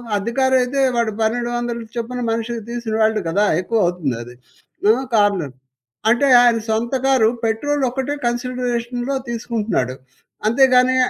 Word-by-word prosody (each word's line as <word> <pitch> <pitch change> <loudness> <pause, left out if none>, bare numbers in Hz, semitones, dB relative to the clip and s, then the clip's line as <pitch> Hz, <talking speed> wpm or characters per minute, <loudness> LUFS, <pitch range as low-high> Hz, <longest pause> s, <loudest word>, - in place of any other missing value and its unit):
అద్దె 205 +3 -2
కారయితే 260 0 +2
వాడు 235 -2 +1
1200 240 +1 -1
చొప్పున 245 +1 -4
మనిషికి 230 0 -3
తీసుకుని 235 -2 -3
వెళ్ళడు 220 -1 +2
కదా! 200 +6 +2
ఎక్కువవుతుంది 175 - 0
అది. 120 - -12 0.5
ఆ! - - +8 0.2
కార్నర్ 200 - +2 0.6
అంటే 245 +5 +3
ఆయన 240 -1 +4
సొంత 225 +3 -1
కారు 260 -5 +4 0.2
పెట్రోలొక్కటే 265 +3 -1
కన్సిడరేషన్‌‌‌‌‌‌లో 245 +1 -2
తీసుకుంటున్నాడు. 225 - -2 0.5
అంతేగాని 255 +2 +4
235 Hz, 115 wpm, -20 LUFS, 220-250 Hz, 0.6 s, ఆ